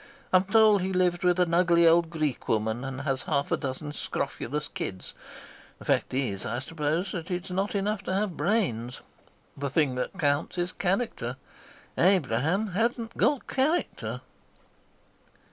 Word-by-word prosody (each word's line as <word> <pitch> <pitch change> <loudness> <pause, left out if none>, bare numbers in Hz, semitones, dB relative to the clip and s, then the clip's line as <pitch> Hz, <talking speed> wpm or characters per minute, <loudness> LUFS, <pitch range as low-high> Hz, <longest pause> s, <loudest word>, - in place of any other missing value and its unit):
I'm 185 +1 +5
told 215 -1 +5
he 190 +1 -1
lives 180 -1 +2
with 180 0 +3
an 175 -2 +2
ugly 170 -1 +5
old 165 0 +5
Greek 155 -5 -2
woman 110 +2 0
and 135 0 -5
has 135 -2 -1
half 145 -2 -1
a - - +4
dozen 140 +2 -4
scrofulous 150 0 -3
kids. 95 -1 -6 0.6
The - - -13
fact - - +1
is, 125 -7 -1
I 115 - -3
suppose, 155 +6 -2
that 170 0 -5
it's 180 +1 -3
not 195 +3 -1
enough 200 +1 0
to - - -1
have 195 -3 -1
brains. 125 - -1 0.5
The 140 0 -3
thing 140 -1 +2
that 190 - -5
counts 145 +1 0
is 175 +1 -1
character. 180 - -1 0.6
Abraham 180 - +2
hadn't 230 +4 -1
got 285 -3 +2
character." 300 +6 -1
170 Hz, 150 wpm, -27 LUFS, 140-195 Hz, 0.6 s, I'm